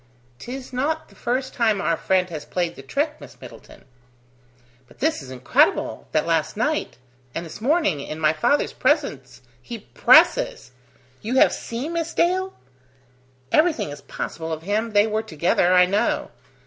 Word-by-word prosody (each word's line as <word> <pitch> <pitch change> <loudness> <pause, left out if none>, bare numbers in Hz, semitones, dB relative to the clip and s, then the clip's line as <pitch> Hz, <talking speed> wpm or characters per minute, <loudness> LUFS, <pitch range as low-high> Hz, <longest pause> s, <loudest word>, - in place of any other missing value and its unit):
"'Tis 255 +1 -8
not 310 +5 -2
the - - -20
first 255 +2 -2
time 220 -5 +1
our 170 -4 +1
friend 185 +1 0
has 155 -3 -5
played 175 0 -2
the - - -10
trick, 290 - -2
Miss - - -13
Middleton." - - -14 1.0
"But - - -20
this 310 - 0
is 135 - -11
incredible, 125 -1 +1
that - - +1
last - - 0
night... - - -1 0.4
and 170 - -3
this 165 +5 -10
morning, 270 - +2
in 155 +3 -6
my 155 -1 +3
father's 160 - +1
presence, - - -1 0.2
he 235 - -7
presses!... - - +3 0.5
You 230 +4 -3
have - - +5
seen 255 +8 -5
Miss 335 0 -3
Dale? 375 +2 +1 1.0
Everything 310 - +2
is 145 -1 -9
possible 160 +3 -6
of 160 0 -4
him: 215 +4 -1
they 205 0 +5
were 215 0 -1
together, 175 -2 +1
I 180 0 +6
know. 200 +3 0
215 Hz, 160 wpm, -23 LUFS, -, 1.0 s, I